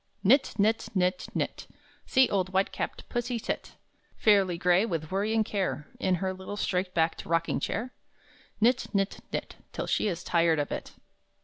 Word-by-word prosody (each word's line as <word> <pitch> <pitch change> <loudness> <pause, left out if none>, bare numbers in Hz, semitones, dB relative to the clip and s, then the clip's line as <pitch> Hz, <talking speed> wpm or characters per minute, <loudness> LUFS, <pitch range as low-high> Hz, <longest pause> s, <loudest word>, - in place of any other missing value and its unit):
Knit, 260 +8 +4
knit, 220 +2 +2
knit, 180 0 +1
knit! - - -2 0.4
See 260 -1 +5
old 185 -2 0
white 190 +1 +1
capped - - -5
Pussy 240 0 -2
sit, 225 - -4 0.4
Fairly 195 -5 +4
gray 180 +3 +4
with 165 -7 -3
worry 200 +3 0
and 220 -1 +2
care, 190 -8 -2
In 185 -1 +2
her 190 +1 -2
little 190 +2 -7
straight 185 -2 -1
backed 165 -1 +1
rocking 165 0 0
chair? 245 +4 -3 0.7
Knit, 240 +3 +3
knit, 195 0 0
knit, - - -4
Till - - -3
she - - +1
is 175 -3 -3
tired 165 -2 +3
of 145 -1 -1
it! - - -5
190 Hz, 170 wpm, -28 LUFS, 175-215 Hz, 0.7 s, See